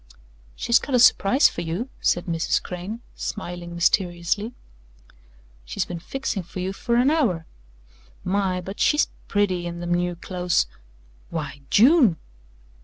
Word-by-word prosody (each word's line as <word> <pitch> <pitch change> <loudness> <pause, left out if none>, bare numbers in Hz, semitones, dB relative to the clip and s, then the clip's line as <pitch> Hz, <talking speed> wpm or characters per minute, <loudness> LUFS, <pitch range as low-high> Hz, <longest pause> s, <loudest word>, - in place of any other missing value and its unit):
"She's 235 +1 +3
got 270 - -2
a - - +4
surprise 245 +3 +6
for - - -5
you," 170 +9 -3
said 175 - +1
Mrs. 165 -1 0
Crane, 185 +6 -6
smiling 175 -4 -6
mysteriously. 175 +5 0 1.1
"She's - - -3
been 175 -1 -6
fixing 245 +1 -3
for 180 +2 -9
you 185 +1 -2
for 235 +4 -1
an 250 +4 +4
hour. 215 - +1 0.8
My! 185 -1 0
but 195 +3 -8
she's 295 0 +3 0.2
pretty 185 -4 0
in 170 0 -6
them 175 0 -1
new 175 0 0
clothes 180 - 0 0.6
why, 145 -4 -5
June!" 245 - +5
180 Hz, 135 wpm, -24 LUFS, 175-225 Hz, 1.1 s, surprise